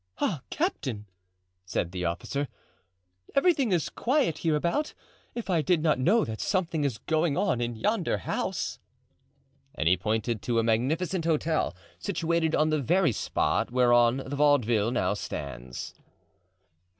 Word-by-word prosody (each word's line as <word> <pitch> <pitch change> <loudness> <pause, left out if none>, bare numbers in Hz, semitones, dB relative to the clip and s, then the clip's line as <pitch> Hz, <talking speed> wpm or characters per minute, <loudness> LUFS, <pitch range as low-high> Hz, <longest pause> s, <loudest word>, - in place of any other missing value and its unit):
"Ah, 160 -10 -1
captain!" 130 - -2 0.6
said 90 -2 -2
the 90 -1 -3
officer, 85 +12 -2 0.9
"everything 275 - +3
is 175 -4 +1
quiet 255 - 0
hereabout—if 170 - -3
I 175 -4 +2
did 155 +2 +1
not 155 -5 +2
know 205 - +3
that 110 -1 -5
something 170 -5 0
is 135 -6 -1
going 155 +4 0
on 185 - +1
in 120 0 -2
yonder 185 - 0
house!" 90 - -3 1.0
And 80 - -1
he 90 +2 +5
pointed 110 +3 -1
to 120 -2 -1
a 115 - +3
magnificent 160 +11 0
hotel 160 - +1 0.2
situated 170 -4 0
on 155 0 +2
the 155 -1 +1
very 170 +3 +3
spot 105 - 0
whereon 120 +1 +4
the 140 - -4
Vaudeville 120 -7 +3
now 125 - +1
stands. 60 -3 -6
145 Hz, 135 wpm, -28 LUFS, 115-170 Hz, 1.0 s, he